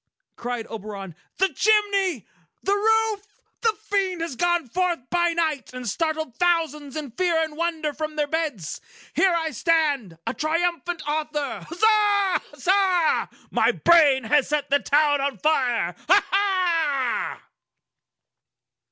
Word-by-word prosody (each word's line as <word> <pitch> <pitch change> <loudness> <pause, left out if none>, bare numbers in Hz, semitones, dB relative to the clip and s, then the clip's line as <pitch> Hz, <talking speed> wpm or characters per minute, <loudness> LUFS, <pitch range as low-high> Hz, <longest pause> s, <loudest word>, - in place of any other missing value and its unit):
cried 240 -1 -4
Oberon. 205 -5 -7 0.2
"The 385 +1 +3
chimney! 400 - +2 0.4
The 395 - +1
roof! 435 0 +1 0.3
The 450 -2 +2
Fiend 390 -5 -1
has 330 -5 -4
gone 345 +1 +1
forth 360 +6 0
by 345 -1 +2
night, 315 -6 -2
and 250 -1 -6
startled 315 - -2
thousands 320 -5 0
in 300 -5 -5
fear 340 +4 +1
and 315 -1 -6
wonder 320 -2 -2
from 310 +1 -5
their 300 -1 +1
beds! 290 - -3 0.3
Here 375 -3 +3
I 325 -1 -1
stand,—a 285 - 0
triumphant 340 +1 -1
author! 300 -2 -3
Huzza! 410 +1 +3
Huzza! 370 -3 +2 0.2
My - - +3
brain 300 -6 +4
has 270 +4 +2
set 295 -2 -1
the 285 - +4
town 290 -1 +2
on 275 0 -2
fire! 245 - +1
Huzza!" 360 -9 +1
320 Hz, 125 wpm, -24 LUFS, 285-365 Hz, 0.4 s, brain